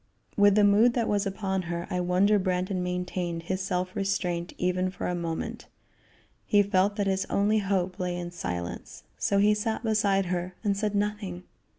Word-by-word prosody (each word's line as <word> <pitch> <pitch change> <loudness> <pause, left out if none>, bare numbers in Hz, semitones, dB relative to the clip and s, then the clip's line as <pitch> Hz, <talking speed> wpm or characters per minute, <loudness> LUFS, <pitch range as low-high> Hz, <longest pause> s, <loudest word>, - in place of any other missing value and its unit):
With 205 -1 +5
the 210 - +5
mood 210 +4 +5
that 235 -2 +1
was 205 -1 +1
upon 190 -1 -2
her, 170 0 -3
I 180 - 0
wonder 185 +4 +3
Brandon 185 0 -1
maintained 180 -1 -3
his 185 +2 -2
self 185 -1 -2
restraint 180 -3 -1
even 180 +1 0
for 185 - -6
a 180 - -1
moment. 170 -2 -4 0.8
He 205 -1 +5
felt 200 0 +2
that 205 -2 0
his 190 0 0
only 210 +2 +2
hope 190 -2 -1
lay 180 -1 -2
in 175 0 -5
silence, 90 - -5 0.2
so 200 - +1
he 205 +1 +5
sat 220 +2 -2
beside 205 -3 +2
her 180 +1 -3
and 205 -2 +1
said 210 0 -1
nothing. 200 -3 -2
190 Hz, 180 wpm, -27 LUFS, 180-205 Hz, 0.8 s, With